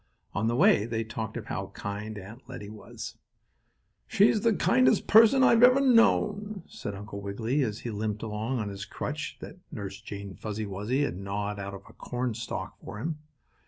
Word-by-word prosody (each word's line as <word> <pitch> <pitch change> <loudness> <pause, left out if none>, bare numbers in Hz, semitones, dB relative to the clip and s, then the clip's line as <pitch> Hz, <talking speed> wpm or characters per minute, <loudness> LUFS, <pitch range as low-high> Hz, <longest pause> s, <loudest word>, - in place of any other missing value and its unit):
On 110 +2 0
the 120 - +1
way 105 -3 +5
they 115 -1 -1
talked 110 0 -5
of - - -6
how - - -4
kind 105 +2 -5
Aunt 110 +6 -11
Lettie 105 0 -7
was. 110 - -9 0.9
"She's 205 +1 +4
the 230 -1 +3
kindest 130 -5 +3
person 230 +5 +7
I - - +7
have 230 -1 +5
ever 250 +2 +8
known," 210 -6 +3
said 100 - -6
Uncle 100 0 -7
Wiggily, 110 +8 -1
as 110 -5 -2
he 120 - -4
limped 105 0 -3
along 110 +4 -2
on 105 -3 -2
his 100 0 -6
crutch 100 - -5
that - - -9
Nurse 100 -1 -6
Jane 100 -1 -7
Fuzzy 110 +2 -4
Wuzzy 105 +8 -1
had 115 - -2
gnawed 100 +1 -3
out 100 0 -5
of 95 - -10
a - - -15
cornstalk 120 -2 -4
for - - -7
him. 155 +7 -3
110 Hz, 185 wpm, -28 LUFS, 100-140 Hz, 0.9 s, ever